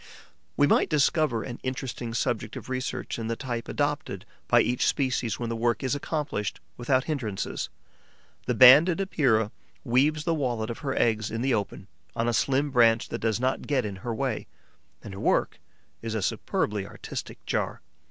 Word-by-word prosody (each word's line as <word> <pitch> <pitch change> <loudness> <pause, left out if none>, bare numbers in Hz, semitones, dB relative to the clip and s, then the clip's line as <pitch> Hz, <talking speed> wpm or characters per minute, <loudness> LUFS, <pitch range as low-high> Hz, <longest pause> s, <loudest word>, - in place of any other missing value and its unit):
We 145 - +5
might - - +3
discover 150 -5 +2
an 120 -2 -7
interesting 130 -3 -4
subject 120 -4 -1
of - - -8
research 130 -2 -3
in 115 - -3
the 115 - -1
type 120 -2 -4
adopted 145 -10 -2 0.2
by - - +5
each 125 +1 +1
species 125 -5 0
when 120 -1 -3
the 115 - -2
work 115 +1 0
is 130 - 0
accomplished 145 - -3 0.2
without 130 +4 +1
hindrances. 120 -11 -3 0.8
The - - +1
Banded 150 +8 +8
Epeira 125 - +2 0.3
weaves 145 +5 +2
the 165 - +1
wallet 120 -7 -1
of 115 - -7
her 135 -2 -3
eggs 110 -2 +1
in 115 +2 -3
the 135 -1 +2
open, 100 -3 -2 0.3
on 115 - 0
a 120 - +1
slim 140 +4 +1
branch 115 -3 +4
that - - -4
does 110 -1 0
not 130 +1 -1
get 135 -5 +1
in 100 -2 -5
her 115 +5 -5
way; 115 0 -2 0.6
and 100 - -8
her 95 - -8
work - - +1 0.4
is 115 -1 -4
a 105 - -1
superbly 105 +3 -1
artistic - - -8
jar. - - -2
120 Hz, 175 wpm, -27 LUFS, 115-140 Hz, 0.8 s, Banded